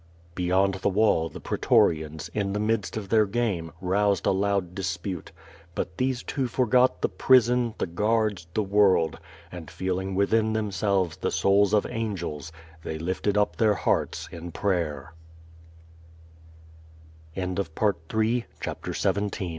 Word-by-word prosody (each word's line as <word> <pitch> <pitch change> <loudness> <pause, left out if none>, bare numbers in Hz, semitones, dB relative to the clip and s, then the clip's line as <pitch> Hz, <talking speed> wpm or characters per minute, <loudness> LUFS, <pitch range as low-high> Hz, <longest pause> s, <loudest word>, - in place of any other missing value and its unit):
Beyond 95 +2 +2
the - - +2
wall, 100 -5 +2
the - - -9
pretorians, 80 0 +1
in 100 -2 -1
the 105 - -1
midst 110 0 -1
of 100 -3 -6
their 110 -1 +4
game, 100 -7 -1
roused 100 +2 +1
a - - +4
loud 95 -2 0
disjmte; 90 -1 -4 0.5
but 90 - -4
these 130 -1 -1
two 135 -3 -2
forgot 125 +1 +2
the - - +4
prison, 125 -2 +3
the - - -1
guards, 105 0 0
the 110 - +2
world, 95 -5 +3 0.3
and 85 -3 -8
feeling 95 +1 -3
within 110 +3 +2
themselves 100 -4 0
the - - -1
souls 100 0 +3
of 105 -1 +3
angels, 90 - -4 0.3
they 80 0 -5
lifted 95 +5 -1
up 105 - +1
their 110 -2 +3
hearts - - -1
in 85 +1 -8
pray 85 -7 -1
100 Hz, 125 wpm, -26 LUFS, 90-110 Hz, 0.5 s, their